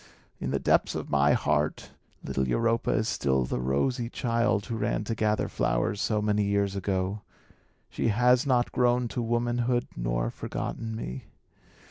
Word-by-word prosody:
In - - -3
the - - +1
depths - - +2
of - - -5
my 70 0 +4
heart, 75 0 0 0.3
little 65 -1 -1
Europa 115 - +1
is 110 - +1
still 65 - +1
the 60 - -2
rosy 115 - 0
child 115 -4 0
who 115 - -4
ran 110 - -1
to 115 - -2
gather 105 -1 0
flowers 100 +1 0
so 105 -2 0
many 105 0 +2
years 100 -1 0
ago. 95 +1 -1 0.7
She - - -2
has 125 +4 +3
not 125 -2 +2
grown 125 0 +2
to 125 - -3
womanhood, 120 +1 0
nor - - -1
forgotten 115 -1 -5
me. 65 - -6
105 Hz, 155 wpm, -28 LUFS, 75-120 Hz, 0.7 s, my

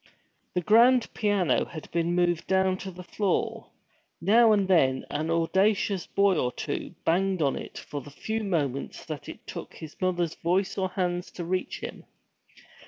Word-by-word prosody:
The 180 - +2
grand 235 +6 +5
piano 200 - +2
had 155 - -10
been 170 +1 0
moved 175 -2 +1
down 190 0 +2
to 190 - -6
the 180 0 -10
floor. 190 +2 -1 0.5
Now 220 +6 +5
and 200 -3 +3
then 135 -8 +3
an 155 +2 -2
audacious 190 +3 +1
boy 200 -4 +3
or 125 - 0
two - - -5
banged 185 0 +2
on 135 -2 +1
it - - -7
for 145 0 -6
the 145 - -11
few 220 +9 -3
moments 145 -9 -2
that - - -6
it - - -10
took - - -8
his 155 -1 -9
mother's 175 -3 0
voice 185 +3 0
or 190 -1 -1
hands 180 -2 -2
to 175 - -5
reach 185 +1 -2
him. - - -7
180 Hz, 170 wpm, -27 LUFS, 165-195 Hz, 0.5 s, grand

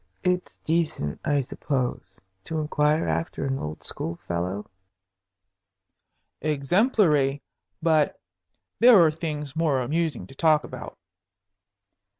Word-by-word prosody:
"It's 180 0 -1
decent, 155 - -1
I 145 -1 +2
suppose, 125 -7 -3 0.3
to 160 - -3
inquire 150 0 +1
after 165 - -2
an 135 0 -1
old 75 +1 -6
school 85 - -2
fellow?" 90 +4 -2 1.8
"Exemplary. 150 - +2 0.4
But 155 -3 +2 0.6
there 235 -3 +8
are 160 - +4
things 150 -3 -5
more 155 -5 +2
amusing 145 - -1
to 95 - -14
talk 155 +1 +3
about." - - -9
150 Hz, 105 wpm, -25 LUFS, 135-165 Hz, 1.8 s, there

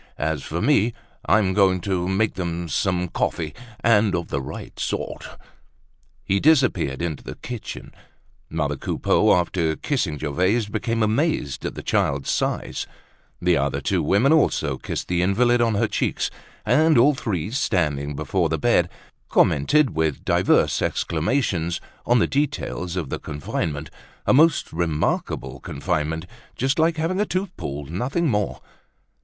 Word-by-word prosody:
As 80 -1 -1
for 85 +5 -3
me, 120 -6 +3 0.3
I'm 100 -4 +3
going 95 -2 +4
to 90 -1 -1
make 100 +3 +1
them 85 -1 -3
some 90 +3 0
coffee, 80 -2 -2 0.3
and 105 -4 +4
of 85 -1 -3
the 70 - -1
right 65 - -8
sort!" - - -4 0.9
He 100 0 +1
disappeared 120 - +2
into 80 -5 -3
the - - -7
kitchen. 120 -3 -7 0.6
Mother - - -1
Coupeau - - +2
after 85 -2 0
kissing 110 - -1
Gervaise, 90 - +1
became 115 +2 -1
amazed 110 - 0
at - - -6
the - - -7
child's 70 -1 0
size. - - -2 0.5
The 90 0 +2
two 70 - +2
other 70 +6 0
women 100 - +3
also 80 - +2
kissed - - -4
the 90 -1 +1
invalid 120 +6 +3
on 115 -2 +2
her 110 +2 +2
cheeks. - - -1 0.3
And 155 +6 +4
all 140 +6 +6
three, 100 - -3
standing 75 - 0
before 80 +3 0
the 80 - 0
bed, - - +2 0.4
commented 135 - +3
with 80 -3 -1
divers - - +3
exclamations 85 - 0 0.3
on 120 - +5
the 115 - +4
details 140 - -2
of 85 -7 -3
the - - -3
confinement—a 75 - -4
most 155 +3 +4
remarkable 80 -2 -1
confinement, 80 +1 -2 0.3
just 135 +5 0
like 160 +1 +3
having 175 +5 0
a - - +2
tooth 185 0 -2
pulled, 70 +1 -6
nothing 130 - -1
more. 105 -6 -1
95 Hz, 145 wpm, -23 LUFS, 80-120 Hz, 0.9 s, all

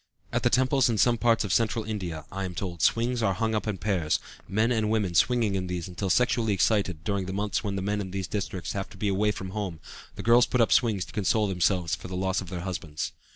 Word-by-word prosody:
At - - +1
the - - +3
temples 130 0 +3
in 115 - 0
some 120 +1 +3
parts 115 -2 +3
of 100 - -1
Central 115 -1 +1
India, 90 -8 -4
I 95 +1 -4
am 90 -2 -5
told, 85 -4 -4
swings 120 +1 +2
are 100 -4 +1
hung 110 +3 0
up 105 0 -1
in 105 -3 -1
pairs, 90 -6 0 0.3
men 110 +4 +1
and 110 -3 +1
women 105 -5 0
swinging 115 +2 +3
in 95 -1 -2
these 90 -1 -3
until 95 +2 -4
sexually 115 +1 +2
excited; 95 -4 +1
during 100 -2 -1
the 95 - -4
months 105 +3 -1
when 100 -2 -2
the 95 - -2
men 105 +1 -1
in 95 - -5
these 95 0 -3
districts 95 -3 -4
have 95 -1 -4
to - - -14
be 100 +1 0
away 100 +2 +2
from 95 -2 -6
home 95 -6 -4 0.4
the - - -6
girls 120 +1 +5
put 125 - 0
up 115 - +3
swings 110 -7 +3
to - - -14
console 105 +1 +1
themselves 90 -2 +1
for 85 - -4
the 90 0 -5
loss 95 +1 0
of 90 - -8
their 90 -1 -4
husbands. 80 -4 -4
100 Hz, 250 wpm, -27 LUFS, 95-110 Hz, 0.4 s, girls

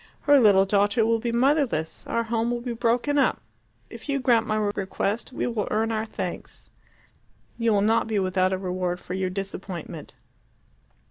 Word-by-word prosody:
Her 285 -1 +5
little 200 -5 +5
daughter 205 +3 +2
will 230 0 +2
be 235 +1 -2
motherless, 245 - 0
our 230 - 0
home 230 0 -1
will 240 0 -2
be 240 -1 -4
broken 240 +5 +1
up. - - +2 0.5
If - - -11
you 280 0 +1
grant 240 -3 +2
my 215 - 0
request 205 +2 -2
you 245 - -2
will 215 -3 -2
earn 220 +1 0
our 220 0 -2
thanks - - -7 0.8
and 230 - -5
you 230 - +4
will 205 -1 +3
not 220 +3 +2
be 220 -2 -1
without 185 -1 +1
a 190 - 0
reward 180 -1 -2
for 180 - -7
your 185 0 -1
disappointment." 185 -4 -6
220 Hz, 180 wpm, -25 LUFS, 190-235 Hz, 0.8 s, Her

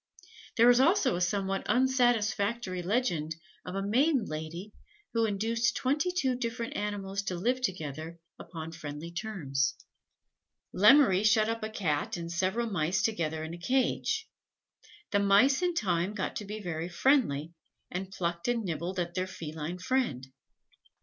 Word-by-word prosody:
There 235 +2 +7
is 245 - +4
also 290 - +4
a 175 - -2
somewhat 195 +1 0
unsatisfactory 235 -6 +1
legend 175 -6 0 0.3
of 180 - -6
a 195 - -1
maiden 255 +4 +2
lady 160 +6 -6 0.4
who 230 -1 +2
induced 225 +3 0
twenty 290 +7 +1
two 275 -8 +1
different 235 -1 -4
animals 200 -1 -3
to 185 - -2
live 245 +9 0
together 165 - -4 0.2
upon 165 -2 -7
friendly 155 0 -7
terms. 170 -9 -1 1.0
Lemmery 210 -1 +6
shut 215 0 +4
up 230 0 -2
a 215 - -3
Cat 200 0 -1
and 170 0 -5
several 190 +7 0
Mice 180 -3 0
together 160 -7 -1
in 160 +1 -6
a 175 - -8
cage. 265 - 0 0.8
The 205 - +3
Mice 205 - +4
in 355 -1 +1
time 185 - 0
got 195 - -3
to 210 - -5
be 210 +2 -6
very 170 -3 -4
friendly, 175 - +2 0.4
and 185 +1 -4
plucked 170 -1 -3
and 240 -2 +1
nibbled 175 +1 -3
at 175 -1 -2
their 185 0 -1
feline 160 -1 -6
friend. 180 - -1
195 Hz, 150 wpm, -30 LUFS, 170-235 Hz, 1.0 s, There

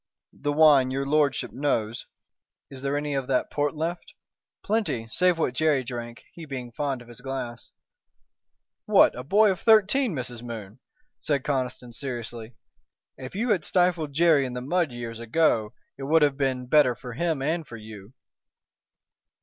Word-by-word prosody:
The 145 - -3
wine 145 -4 +5
your 135 +1 -2
lordship 145 0 +1
knows 120 -5 -1 0.3
" - - -58
"Is 135 -1 -9
there 140 +1 -1
any 145 0 -2
of 135 -2 -2
that 130 -2 0
port 145 +1 -1
left?" 165 +3 -4 0.5
"Plenty, 200 - -1
save 180 +3 +3
what 145 -6 0
Jerry 145 -1 +2
drank, 120 -1 -7
he 165 - -9
being 125 -4 -6
fond 135 -1 -3
of - - -20
his 120 0 -13
glass." 130 -3 -6 1.2
"What! - - +6
a 125 - -6
boy 205 +8 +4
of 185 - -3
thirteen, 220 - +4
Mrs. 120 -3 -5
Moon!" 115 -2 -8 0.4
said 140 -3 -1
Conniston, 125 -3 -3
seriously. 120 -2 -6 0.6
"If 130 +3 -9
you 230 +5 -1
had 185 -7 +1
stifled 175 -5 +1
Jerry 160 -2 +4
in 130 -2 -4
the 125 - -3
mud 170 +2 0
years 115 -1 -6
ago 115 -3 +1 0.2
it - - -6
would 155 +2 +4
have 145 -2 +3
been 130 -2 -1
better 125 -2 +4
for 125 +1 -9
him 160 +1 -1
and 160 +1 -1
for 115 - -9
you." 105 0 -12
135 Hz, 165 wpm, -26 LUFS, 120-155 Hz, 1.2 s, What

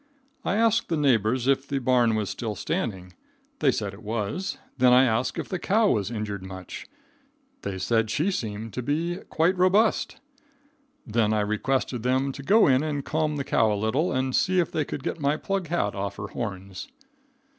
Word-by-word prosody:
I 190 - 0
asked 225 0 +2
the 165 - 0
neighbors 125 -3 +2
if 135 0 +2
the 140 - -1
barn 125 -3 +3
was 105 -3 -1
still 110 +1 -4
standing. 95 -2 -3 0.5
They - - +4
said 100 -1 -3
it 100 - -12
was. 110 - -3 0.2
Then 125 0 +6
I 125 +1 +7
asked 115 0 0
if - - -3
the 185 - -3
cow 210 +4 +3
was 100 -4 0
injured 105 -4 -4
much. 95 -1 -8 0.7
They 100 -1 -4
said 115 +3 +1
she 155 - +1
seemed 110 - -4
to 125 - -3
be 165 +7 -1
quite 170 +4 +2
robust. 190 +5 +2 0.9
Then 110 -1 +1
I 105 - +2
requested 120 +4 -1
them 130 +3 +1
to 140 - -8
go 210 +10 +5
in 130 -1 +4
and 150 -3 -3
calm 155 -1 0
the 140 - -2
cow 110 -4 +2
a 105 - 0
little, 115 - 0
and 130 0 0
see 185 0 +2
if 175 - 0
they 155 - -1
could 135 - -6
get - - -3
my 145 +1 +1
plug 195 -1 -2
hat 150 -11 0
off 100 0 -4
her 100 -1 -6
horns. 95 -4 -6
125 Hz, 190 wpm, -26 LUFS, 105-155 Hz, 0.9 s, I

